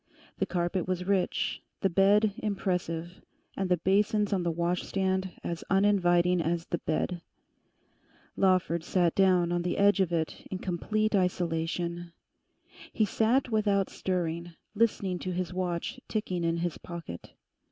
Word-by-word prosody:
The - - +1
carpet 175 0 -1
was 180 -1 -1
rich, 190 -1 0 0.2
the 195 - +3
bed 200 +3 +4
impressive, 180 -4 -2 0.3
and 190 -1 -2
the 180 - +3
basins 205 +3 +2
on 190 - +1
the 175 - 0
washstand 185 +3 -1
as 170 -1 -4
uninviting 180 -3 +3
as 165 +1 -1
the 175 - -3
bed. 175 +2 -2 1.1
Lawford 185 -3 +2
sat 175 -1 +2
down 180 -3 +3
on 175 0 +1
the 175 0 -2
edge 200 0 +4
of 185 -3 +2
it 160 -2 -2
in 190 - -3
complete 215 +5 -1
isolation. 175 -2 -1 0.8
He 215 - +2
sat 235 +5 +1
without 205 -3 +1
stirring, 175 -2 -2 0.2
listening 200 -4 +1
to 185 - -3
his 180 0 -3
watch 180 +7 -3
ticking 185 -5 -2
in 165 0 +1
his 170 -1 -2
pocket. 170 - -8
180 Hz, 140 wpm, -29 LUFS, 170-195 Hz, 1.1 s, bed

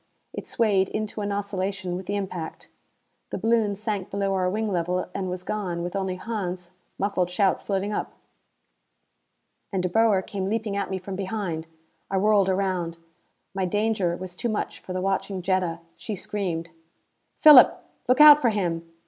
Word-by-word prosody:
It - - -6
swayed 200 -4 +2
into 215 0 -3
an 205 0 -2
oscillation 195 -2 -2
with 185 0 -6
the 205 - -1
impact. 185 -5 -5 0.6
The - - -3
balloon 225 -3 +1
sank 205 -2 -3
below 195 0 -1
our 185 -1 +1
wing 215 +2 -1
level 180 0 -1
and 190 -2 -3
was 180 0 -4
gone, 180 -5 -3
with 175 +2 -5
only 190 -2 -1
Hans, 185 -4 -4 0.3
muffled 190 -3 0
shouts 190 +1 +1
floating 200 +1 -2
up. - - -3 1.6
And 190 -3 -1
De 180 - 0
Boer 210 -1 +3
came 195 -1 -4
leaping 220 -2 -2
at 200 - -2
me 190 - -2
from 190 +1 -6
behind. 190 -5 -3 0.4
I 195 - 0
whirled 200 -1 +3
around. 185 -3 -1 0.6
My 190 -1 -1
danger 205 -2 0
was 185 -1 -7
too 240 +5 -2
much 215 - -3
for - - -10
the 185 0 -2
watching 195 0 -1
Jetta. 180 -3 0 0.2
She 215 - -5
screamed. 175 -4 -4 0.7
"Philip, 295 -5 +8 0.2
look 250 +2 +3
out 300 0 +10
for 240 - +4
him!" 170 -6 -2
195 Hz, 165 wpm, -25 LUFS, 180-210 Hz, 1.6 s, out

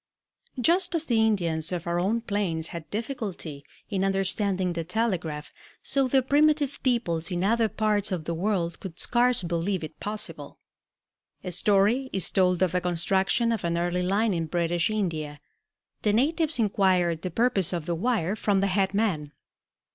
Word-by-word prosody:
Just 355 +6 +3
as 325 -1 -1
the 230 -5 +2
Indians 170 -7 +1
of 175 -2 -3
our 170 0 0
own 215 +6 0
plains 195 -8 -2
had 165 -3 -8
difficulty 205 - -5 0.2
in 195 -3 -1
understanding 195 -1 0
the 170 -1 -3
telegraph, 180 -6 -2 0.3
so 270 -1 +3
the 265 0 +3
primitive 290 +1 +2
peoples 175 -11 0
in 175 0 -2
other 225 +2 +2
parts 210 -2 0
of 180 -4 -2
the 170 - -3
world 170 -1 -1
could 180 -3 -8
scarce 245 -1 +2
believe 175 +2 -1
it 155 - -8
possible. 210 +1 -5 0.9
A 180 - -4
story 210 +7 +2
is 190 - +1
told 180 -1 +2
of 185 - +1
the 180 +1 0
construction 190 +6 +1
of 225 -4 -2
an 170 0 0
early 175 +1 0
line 200 +4 +1
in 165 -2 -2
British 170 +1 0
India. 160 -9 -3 0.6
The 210 - +1
natives 310 +6 +1
inquired 185 -6 +2
the 185 - -3
purpose 205 -2 +2
of 170 -4 -3
the 170 - -1
wire 200 0 0
from 205 -2 +1
the 195 - +2
head 195 0 +1
man. 165 -9 -1
195 Hz, 165 wpm, -26 LUFS, 170-225 Hz, 0.9 s, Just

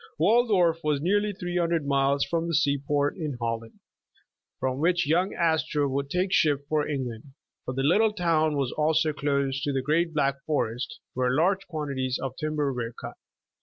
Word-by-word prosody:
Waldorf 195 -8 +3
was 150 -2 +1
nearly 205 +6 +1
three 180 -3 -4
hundred 170 -3 0
miles 140 0 +2
from 165 0 -1
tlie 165 - 0
sea 140 -3 +2
port 145 +1 0
in 150 -7 -4
Holland, 115 -1 -4 0.8
from 130 0 -1
which 175 +2 +2
young 175 +6 +1
Astor 160 -3 +1
would 140 +1 -2
take 185 +4 0
ship 145 -2 +2
for 150 -1 0
England, 130 -2 -5 0.3
but 125 - -3
the 135 - -1
little 210 +9 +4
town 165 -6 +1
was 135 -3 0
also 155 0 +1
close 140 -2 -1
to 145 0 -1
the 135 -1 -1
great 165 +4 +1
Black 140 -1 0
Forest, 125 -5 -2 0.2
where 125 0 +1
large 190 +6 +1
quantities 140 -6 -2
of 130 -1 -4
timber 150 -2 -1
were 120 -1 -4
cut. - - -7
150 Hz, 175 wpm, -26 LUFS, 135-170 Hz, 0.8 s, little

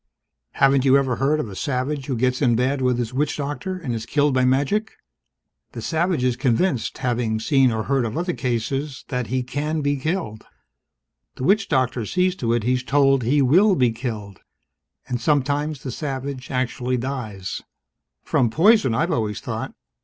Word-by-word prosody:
"Haven't 135 -1 +3
you 135 0 +5
ever 130 -3 0
heard 145 +3 +1
of 150 - -2
a 100 - -9
savage 135 +2 -2
who 135 - -1
gets 125 +3 0
in 120 -4 +3
bad 130 +3 0
with 125 -1 +2
his 120 0 -3
witch 145 +3 0
doctor 145 +6 -4
and 145 -9 -4
is 115 -1 -5
killed 145 -1 +2
by 130 -1 +2
magic? 140 +12 +1 0.8
The - - -6
savage 170 -3 0
is 125 -1 +2
convinced, 125 - 0
having 120 -3 -1
seen 135 +1 +3
or 110 -1 -2
heard 135 0 +1
of 110 +4 -4
other 175 +1 -1
cases, 135 +3 -3
that 125 -4 -2
he 130 +1 -1
can 150 +5 -2
be 145 0 +1
killed. 155 - -3 0.9
The - - -6
witch 200 +7 +2
doctor 125 -5 0
sees 185 - +1
to 115 -2 -1
it 120 -2 0
he's 125 +2 +1
told 135 0 +3
he 135 +5 +2
will 185 +10 +5
be 125 -6 +3
killed. 110 -5 -6 0.7
And 125 -1 -3
sometimes 145 0 0
the 130 - -4
savage 135 -1 -5
actually 125 0 -1
dies 115 -7 -4 0.3
" - - -59
"From 120 - +1
poison, 165 - +4
I've 165 +8 +1
always 110 -8 -1
thought." - - -5
130 Hz, 180 wpm, -22 LUFS, 125-145 Hz, 0.9 s, you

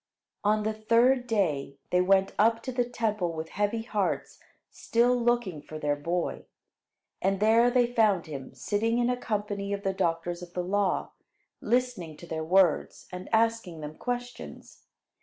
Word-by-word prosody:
On 210 +1 +2
the 220 +1 0
third 235 +4 +3
day, 155 - 0
they 180 - +4
went 195 +1 +3
up 225 +2 +3
to 260 - -4
the 245 0 +1
Temple 215 -7 -1
with 160 0 -5
heavy 210 +3 -1
hearts, 210 -4 -2 0.3
still 240 +2 +2
looking 240 -9 0
for 155 - -9
their 150 -1 0
boy. 170 +4 -3 0.8
And 195 0 +1
there 225 +3 +5
they 245 -1 +2
found 210 -7 +3
him 140 -4 -8
sitting 225 +3 0
in 240 0 +2
a - - +1
company 205 -4 -3
of 200 0 -4
the 195 -1 0
doctors 170 0 -1
of 175 -1 -10
the 180 - -2
law, 195 +1 0 0.5
listening 235 -11 -1
to - - -11
their 160 -1 -4
words 180 0 +2
and 180 0 -7
asking 225 -7 +1
them 150 0 -6
questions. 245 +2 -6
205 Hz, 160 wpm, -28 LUFS, 175-230 Hz, 0.8 s, there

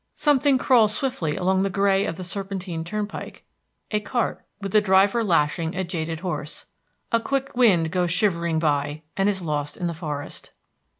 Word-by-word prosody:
Something 285 -2 +3
crawls 230 -5 +4
swiftly 215 - -1
along 190 0 +1
the 195 - +1
gray 195 0 +2
of 165 - -4
the 185 - -5
serpentine 185 -3 -4
turnpike, 210 +3 -5 0.5
a 210 - +2
cart, 235 +3 -2 0.2
with 200 -2 -5
the 215 - +5
driver 195 +3 +4
lashing 165 -2 +1
a 190 - -1
jaded 165 -2 -4
horse. 150 -5 -4 0.5
A 230 - +4
quick 275 +3 -2
wind 185 -10 +4
goes 180 -1 +1
shivering 170 -3 +1
by, 145 -1 0
and 195 +1 +2
is 190 -3 -2
lost 145 -2 -2
in 180 - -3
the 170 - -1
forest. 150 -3 -6
185 Hz, 170 wpm, -24 LUFS, 165-210 Hz, 0.5 s, the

